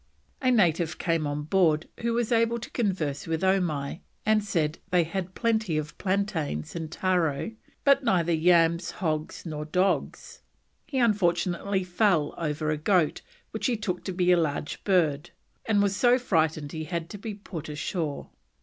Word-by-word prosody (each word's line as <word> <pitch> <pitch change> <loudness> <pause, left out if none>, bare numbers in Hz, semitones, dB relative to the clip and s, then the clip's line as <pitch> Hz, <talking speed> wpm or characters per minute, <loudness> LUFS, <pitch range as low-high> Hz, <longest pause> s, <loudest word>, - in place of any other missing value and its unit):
A 255 - +2
native 175 -8 +2
came 165 -3 0
on 145 +1 -3
board 160 -1 +2
who 235 0 0
was 235 -1 0
able 230 0 +3
to 235 - -8
converse 170 - -1
with 165 +2 -1
Omai, 170 -6 0 0.3
and 215 -1 +3
said 165 -6 -1
they 180 -2 +4
had 185 +2 -4
plenty 220 -8 +1
of 150 0 -4
plantains 185 - -2
and 160 -2 -5
taro, 175 -2 0 0.3
but 275 -1 +4
neither 175 -6 +2
yams, 170 +1 +3
hogs, 155 -2 -3
nor 155 -2 -4
dogs. 180 +5 -1 0.5
He 275 - -3
unfortunately 190 -3 +1
fell 180 -4 +2
over 155 -1 -1
a 155 - 0
goat, 170 0 +2 0.3
which - - -1
he 245 -3 0
took 185 -4 -3
to 190 - -2
be 180 0 +2
a 180 - +6
large 150 -3 -2
bird, 160 -7 +2 0.4
and 205 -2 +3
was 200 -1 +1
so 245 +3 +4
frightened 160 - 0
he 155 -1 -5
had 170 0 -3
to 205 - -7
be 210 0 -5
put 175 -6 -8
ashore. 150 0 -3
175 Hz, 165 wpm, -27 LUFS, 155-200 Hz, 0.5 s, a